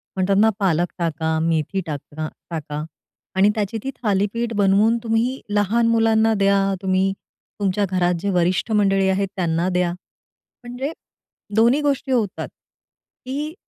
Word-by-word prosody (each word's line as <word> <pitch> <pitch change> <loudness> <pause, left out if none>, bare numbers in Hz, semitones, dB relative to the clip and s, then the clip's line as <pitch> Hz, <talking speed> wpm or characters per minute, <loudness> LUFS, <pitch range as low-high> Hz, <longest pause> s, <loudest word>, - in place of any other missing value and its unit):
म्हणतात 190 +1 +1
ना 220 +1 +5
पालक 175 -3 +2
टाका, 160 -1 -1
मेथी 165 +3 0
टांका 155 0 -5 0.2
टाका, 150 -2 -4 0.5
आणि 195 +2 +5
त्याची 210 0 -2
ती 270 - -3
थालीपीठ 210 +3 0
बनवून 205 +3 +3
तुम्ही 230 +3 0
लहान 210 +3 +2
मुलांना 225 -1 +3
द्या, 195 0 +3
तुम्ही 190 0 +1 0.5
तुमच्या 200 0 +1
घरात 180 -1 +1
जे 200 - -2
वरिष्ठ 180 +4 +1
मंडळी 195 -2 +3
आहेत 195 +1 +1
त्यांना 170 -2 0
द्या, 180 -1 +1 0.7
म्हणजे 245 +4 -4 0.6
दोन्ही 235 +6 +4
गोष्टी 280 -2 -1
होतात. 220 -5 0 0.8
की 290 +4 -4
195 Hz, 130 wpm, -21 LUFS, 180-225 Hz, 0.8 s, ना